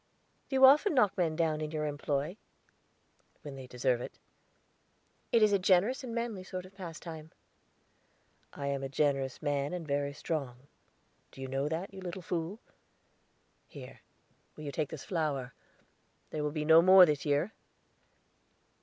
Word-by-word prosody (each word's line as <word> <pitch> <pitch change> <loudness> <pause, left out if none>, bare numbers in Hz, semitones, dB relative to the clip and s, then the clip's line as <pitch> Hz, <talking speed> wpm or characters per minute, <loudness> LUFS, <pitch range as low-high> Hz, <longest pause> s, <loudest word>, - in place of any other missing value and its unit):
"Do 270 - -2
you 265 0 +8
often 300 +7 +6
knock 210 -7 +3
men 165 -4 0
down 155 -2 0
in 155 - -3
your 155 -1 -3
employ?" 145 +3 -2 1.1
"When 145 - -7
they 130 -1 -9
deserve 125 0 0
it." - - -8 1.1
"It 230 -2 +5
is 210 -1 +4
a 200 - +4
generous 195 +9 +2
and 235 -2 -5
manly 230 -5 -3
sort 185 -1 -6
of 185 - -15
pastime." 165 -4 -8 1.2
"I 140 - -6
am 140 -1 -1
a 135 - -4
generous 135 -1 0
man 145 +1 -1
and 175 -2 -4
very 140 0 -1
strong; 140 -4 -4 0.7
do - - -15
you 135 - -5
know 135 +2 -1
that, 170 +5 -4
you 190 - -9
little 180 0 -6
fool? 170 +4 -3 1.1
Here, - - -11 0.6
will 155 - -10
you 145 - -4
take 150 -1 -2
this 155 -4 -8
flower? 145 -8 -2 0.8
There 150 - -3
will 150 - 0
be 150 0 -3
no 160 +1 +8
more 185 +1 +9
this 150 -3 -1
year." 150 +7 0
155 Hz, 160 wpm, -31 LUFS, 140-185 Hz, 1.2 s, more